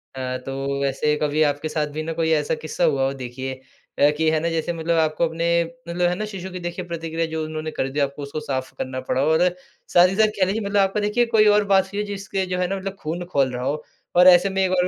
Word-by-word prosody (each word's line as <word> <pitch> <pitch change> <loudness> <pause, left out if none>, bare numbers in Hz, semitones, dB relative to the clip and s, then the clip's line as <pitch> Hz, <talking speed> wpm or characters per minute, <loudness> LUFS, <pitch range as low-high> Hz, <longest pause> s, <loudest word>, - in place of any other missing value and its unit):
अ, 130 -1 -3
तो 135 +1 -3
वैसे 140 +2 +1
कभी 150 +1 +1
आपके 145 +1 0
साथ 150 -1 -1
भी 155 - -3
ना 165 +1 -3
कोई 160 0 0
ऐसा 155 0 +1
किस्सा 155 +3 -4
हुआ 145 -5 +3
हो, 135 - -1
देखिए 130 0 -5 0.5
अ, 145 - +6
कि 160 0 +2
है 160 - +2
ना 170 - -1
जैसे 165 +1 -1
मतलब 165 0 -1
आपको 155 +1 +1
अपने, 170 +1 +1 0.3
मतलब 175 +1 +1
है 180 - -1
ना 215 - -3
शिशु 190 -3 -7
की 180 - -6
देखिए 175 +1 -5
प्रतिक्रिया 165 -1 -3
जो 160 0 -1
उन्होंने 155 0 -5
कर 135 - -2
दी, 140 +2 -3
आपको 140 0 -1
उसको 140 +2 -5
साफ 130 -3 -3
करना 130 0 -4
पड़ा 130 - +2
हो 140 - +2
और 160 +3 +4 0.5
साथ 175 +1 +7
ही 190 - -2
साथ 220 +1 +5
कह 185 - +5
लीजिए, 200 +4 -1
मतलब 200 +1 0
आपको 195 +2 +1
देखिए 210 +3 +2
कोई 215 -1 +6
और 210 - +3
बात 190 -1 +5
हुई 205 - -2
है, 210 - -1
जिसके 195 -1 -3
जो - - 0
है 180 - +1
ना 195 - -2
मतलब 195 0 -5
खून 165 +3 -4
खौल 135 -2 +2
रहा 125 0 -4
हो 150 +2 -2 0.3
और 180 +1 +7
ऐसे 180 +1 +7
में 190 0 0
एक 185 - +1
और 180 0 +3
160 Hz, 270 wpm, -23 LUFS, 145-180 Hz, 0.5 s, साथ